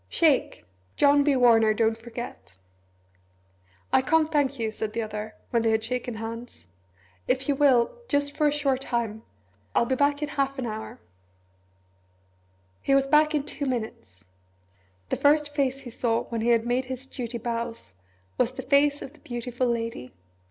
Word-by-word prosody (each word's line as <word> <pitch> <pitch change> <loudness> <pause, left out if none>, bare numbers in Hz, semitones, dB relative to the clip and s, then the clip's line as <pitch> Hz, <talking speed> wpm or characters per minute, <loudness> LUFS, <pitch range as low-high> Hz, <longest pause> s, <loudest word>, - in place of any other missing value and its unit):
Shake! 315 -5 +2 0.3
John 285 0 +5
B. 285 -1 +3
Warner 225 -3 +5
don't 225 0 +2
forget." 225 - -9 1.4
"I - - +6
can't 315 +3 +2
thank 280 -2 +1
you," 225 -2 -2
said 215 0 -4
the 230 - -1
other, 215 0 -6 0.2
when 235 - +2
they 225 - +2
had 220 0 +1
shaken 245 0 -3
hands. 225 - -7 0.6
"If 260 0 0
you 285 - +3
will 265 -4 +4 0.2
just 285 -1 0
for 300 - +3
a - - +3
short 280 -3 0
time! 230 -4 -2 0.5
I'll - - +4
be 260 - 0
back 285 +2 +1
in 295 - -2
half 275 -1 -1
an 260 - -3
hour 220 +2 -6 0.9
" 95 0 -39
He 275 - +2
was 275 0 +4
back 305 +2 +4
in 290 - +1
two 285 -1 -4
minutes. 115 - -5 0.8
The - - 0
first 295 0 +3
face 275 -2 0
he 250 -3 -9
saw 230 -1 0
when 230 -1 -4
he 235 - +1
had 230 -1 +3
made 245 +2 0
his 260 0 -6
duty 245 -3 -5
bows 230 - -3 0.5
was 250 +1 +2
the - - -6
face 285 +1 +3
of 270 - -9
the 310 - -20
Beautiful 245 0 -3
Lady. 230 - -3
245 Hz, 175 wpm, -26 LUFS, 225-280 Hz, 1.4 s, I